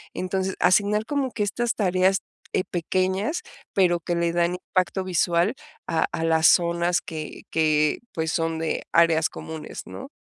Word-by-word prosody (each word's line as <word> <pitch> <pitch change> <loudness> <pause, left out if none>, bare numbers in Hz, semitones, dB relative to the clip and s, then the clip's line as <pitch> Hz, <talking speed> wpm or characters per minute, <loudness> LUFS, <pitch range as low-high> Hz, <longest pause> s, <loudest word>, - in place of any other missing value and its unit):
entonces 190 +1 -2
asignar 210 +3 +3
como 280 0 -1
que 210 - -1
estas 235 +4 -1
tareas, 185 -1 +2 0.3
eh, - - +1
pequeñas, 185 - -1 0.3
pero 175 -3 +3
que 170 +1 -2
le 170 0 +1
dan 175 0 +1
impacto 185 +1 -1
visual 175 +2 +1 0.3
a 165 - +1
a 165 - -2
las 160 -1 +4
zonas 170 0 +3
que 155 -1 -7
que, 155 -1 +2
pues, 160 -1 -1
son 165 -1 -1
de 160 0 -2
áreas 165 -1 +4
comunes, 160 -1 -8
¿no? 270 - -8
175 Hz, 155 wpm, -24 LUFS, 165-190 Hz, 0.3 s, las